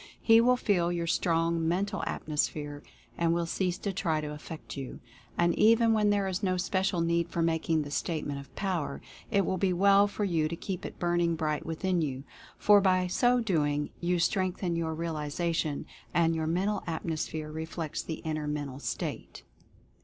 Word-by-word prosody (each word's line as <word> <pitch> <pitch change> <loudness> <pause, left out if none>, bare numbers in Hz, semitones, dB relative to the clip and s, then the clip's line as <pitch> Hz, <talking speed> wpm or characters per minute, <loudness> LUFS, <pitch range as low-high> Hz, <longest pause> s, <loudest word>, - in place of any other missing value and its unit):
He 225 0 +6
will 250 +1 +4
feel 180 -7 +1
your 170 -1 -1
strong 165 -1 +1
Mental 195 +4 0
Atmosphere 145 -1 -2 0.4
and 170 0 +2
will 170 0 0
cease 180 +1 -1
to 200 - -3
try 165 -4 0
to 150 -1 -4
affect 155 +1 -8
you. 135 -3 -6 0.4
And 175 0 +3
even 230 +3 +5
when 210 -1 +3
there 200 -1 +2
is 185 +1 -2
no 185 -3 +1
special 190 -1 0
need 170 0 +1
for 170 0 -1
making 160 -1 +1
the 145 - -8
Statement 145 -2 -2
of 140 - -13
Power 175 -8 -2 0.3
it 200 -4 +2
will 185 - -1
be 190 0 +2
well 200 +2 +5
for 205 +1 -3
you 165 -6 +1
to 170 - -4
keep 185 +1 -5
it - - -11
burning 175 -1 +1
bright 155 -1 -2
within 175 +2 0
you, 135 -3 -3 0.3
for 205 -1 +6
by 185 -1 +3
so 245 +7 +3
doing 150 -8 0
you 175 +1 +1
strengthen 185 -1 0
your 160 -1 -1
realization, 160 -1 -2 0.3
and 165 -1 +4
your 160 -1 -1
Mental 190 +6 0
Atmosphere 160 -1 -3
reflects 160 0 -4
the 160 - -6
inner 155 -1 -2
mental 145 -3 -3
state. - - -5
170 Hz, 175 wpm, -29 LUFS, 155-190 Hz, 0.4 s, He